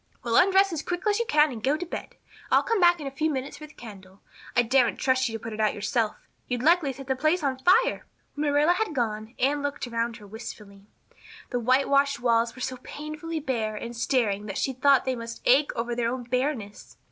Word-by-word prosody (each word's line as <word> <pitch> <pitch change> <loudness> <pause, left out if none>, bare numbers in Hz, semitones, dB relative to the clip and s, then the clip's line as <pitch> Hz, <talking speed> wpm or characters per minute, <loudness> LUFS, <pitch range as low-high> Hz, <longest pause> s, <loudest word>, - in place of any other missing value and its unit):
"Well, 235 -1 -1
undress 385 0 +5
as 310 - -2
quick 355 +4 -4
as 415 +1 +2
you 470 - -1
can 300 0 +4
and 225 -3 -8
go 280 +3 +2
to 355 - -5
bed. 340 - -7 0.3
I'll - - +4
come 460 -3 0
back 345 -1 +5
in 295 - -7
a 275 - -4
few 310 +4 -1
minutes 270 -2 -4
for 305 - -9
the 295 - -19
candle. 195 -4 -12 0.4
I 245 - +5
daren't 245 0 +2
trust 260 -1 +1
you 225 - -4
to 225 - -20
put 225 -1 -5
it 215 - -7
out 215 -1 +1
yourself. 220 +1 -1 0.3
You'd 245 -1 -2
likely 330 -3 +4
set 270 +1 -10
the 265 0 -1
place 310 +5 +1
on 265 -2 -1
fire." 380 - +3 0.3
When 295 0 -1
Marilla 295 +4 +4
had 370 -4 -2
gone 220 -2 -2
Anne 285 +3 +1
looked 285 -1 -3
around 230 -1 -2
her 210 - -14
wistfully. 205 -1 -10 0.6
The 245 - 0
whitewashed 275 +3 +2
walls 230 -1 +1
were 255 - -10
so 255 0 -3
painfully 305 +5 -6
bare 230 -7 -2
and 235 +3 -6
staring 225 -4 0
that 195 - -5
she 265 - -1
thought 275 +1 +3
they 260 -1 0
must 230 -1 -8
ache 280 +4 +4
over 235 +1 -2
their 235 -1 0
own 255 0 -4
bareness. 250 -4 -3
260 Hz, 230 wpm, -26 LUFS, 230-300 Hz, 0.6 s, undress